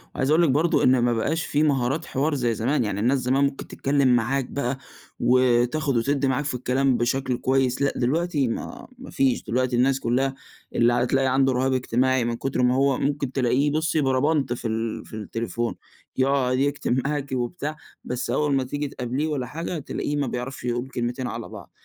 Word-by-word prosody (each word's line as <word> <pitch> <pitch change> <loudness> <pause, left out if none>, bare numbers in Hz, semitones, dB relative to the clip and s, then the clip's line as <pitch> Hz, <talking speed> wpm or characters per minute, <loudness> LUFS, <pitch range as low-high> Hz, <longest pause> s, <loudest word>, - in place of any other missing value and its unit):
وعايز 135 +2 0
أقول 165 +3 +4
لِك 160 - +3
برضو 155 +5 +2
إن 130 0 +5
ما 120 0 +2
بقاش 155 +8 -1
في 150 0 +1
مهارات 140 +1 +1
حوار 145 +3 0
زي 120 -4 0
زمان، 120 +6 0
يعني 100 -2 -2
الناس 125 +6 +2
زمان 130 +2 +1
ممكن 140 0 -2
تتكلّم 135 -3 +2
معاك 130 +3 0
بقى 135 0 -3 0.4
وتاخد 125 +3 +2
وتدِّي 135 +3 +1
معاك 130 +3 0
في 140 - -2
الكلام 130 +1 +1
بشكل 125 +1 0
كويس، 130 0 +1
لأ 140 - +2
دلوقتي 145 +2 0
ما 115 - -5
ما 260 +1 -10
فيش، 130 -2 +1
دلوقتي 125 +1 0
الناس 130 +2 +2
كلّها 135 +3 0 0.4
اللي 120 +1 +4
ع 120 - +2
تلاقي 135 +1 +1
عنده 135 0 +3
رهاب 130 +1 +1
اجتماعي 130 0 +1
من 120 0 -1
كتر 130 +2 -2
ما 125 0 +3
هو 135 0 +2
ممكن 140 -2 -1
تلاقيه 135 +2 +1
بُصّي 155 0 +1
بربنط 135 0 +1
في 120 -1 -4
ال 115 0 -3
في - - -10
التليفون، 115 +2 -3 0.4
يقعد 130 -1 +2
يكتب 140 -2 0
معاكِ 145 -2 -3
وبتاع، 145 +5 -3 0.3
بس 125 0 -4
أول 150 -2 +1
ما 135 - +1
تيجي 145 +3 -3
تقابليه 130 +4 -3
والّا 145 -5 -2
حاجة 165 +6 -4
تلاقيه 145 +1 -3
ما 145 -2 0
بيعرفش 125 +2 -5
يقول 120 +2 -2
كلمتين 120 0 -3
على 115 -1 -6
بعض، - - -11
130 Hz, 190 wpm, -24 LUFS, 125-140 Hz, 0.4 s, إن